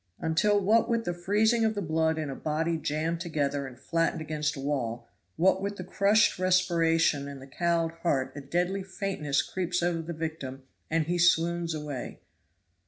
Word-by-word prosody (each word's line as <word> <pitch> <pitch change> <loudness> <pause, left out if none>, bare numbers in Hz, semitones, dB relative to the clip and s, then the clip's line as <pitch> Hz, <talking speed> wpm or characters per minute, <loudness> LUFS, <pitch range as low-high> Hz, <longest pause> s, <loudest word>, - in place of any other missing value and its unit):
"Until 175 +6 +2
what 215 +4 +3
with 230 -1 0
the 175 - -1
freezing 210 +6 +2
of 220 -1 +1
the 205 - -2
blood 160 0 +1
in 155 -3 -3
a - - -5
body 160 +2 -1
jammed 160 +2 -2
together 145 -5 -1
and 125 -2 -11
flattened 165 +6 0
against 150 -1 -2
a - - -7
wall 120 -5 -2 0.3
what 190 +2 +3
with 200 +1 -2
the 185 - -6
crushed 200 +2 +3
respiration 165 -5 +2
and 140 -1 -8
the 135 - -11
cowed 165 +3 0
heart 135 -6 0
a 145 - -6
deadly 175 +7 -1
faintness 185 -7 -1
creeps 180 -1 -2
over 175 -1 0
the 165 +1 -6
victim 155 -5 -5 0.3
and 160 -1 +1
he 175 +2 -1
swoons 170 -1 +2
away!" 150 -4 -6
165 Hz, 175 wpm, -28 LUFS, 150-185 Hz, 0.3 s, what